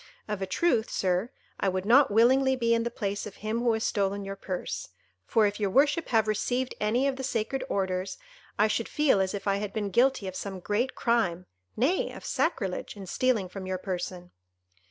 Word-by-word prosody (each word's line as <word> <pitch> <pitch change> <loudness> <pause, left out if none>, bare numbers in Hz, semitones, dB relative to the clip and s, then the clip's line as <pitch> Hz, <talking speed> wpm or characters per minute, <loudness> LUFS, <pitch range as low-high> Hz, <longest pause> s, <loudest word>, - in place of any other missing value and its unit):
Of 210 -2 -3
a 190 - -2
truth, 230 - +1
Sir, 185 +4 0 0.3
I 195 - +2
would 185 0 -2
not 265 +6 +6
willingly 260 +5 +4
be 230 -2 +2
in 230 - +2
the 235 - -1
place 205 -2 -3
of 200 - -10
him 215 +2 -2
who 235 -1 +2
has 220 0 -1
stolen 200 -1 0
your 195 0 -5
purse; 185 -2 -5 0.4
for 225 -2 +4
if 205 +1 -1
your 205 -2 +1
worship 290 - +3
have 220 -3 +2
received 245 +4 0
any 235 +6 +2
of 270 -1 -1
the 265 - -5
sacred 255 +1 -1
orders, 185 -1 -1 0.4
I 210 - +4
should 225 +1 -1
feel 295 -10 +3
as 190 +1 -1
if 200 0 -6
I 200 0 +2
had 205 0 -4
been 205 -2 -2
guilty 245 -1 +3
of 185 - -5
some 195 -1 -5
great 210 +8 -1
crime—nay 185 - 0
of - - -10
sacrilege—in 200 - -2
stealing 225 0 +1
from 190 +1 -7
your 185 0 -1
person." 180 -1 -5
210 Hz, 195 wpm, -28 LUFS, 190-240 Hz, 0.4 s, not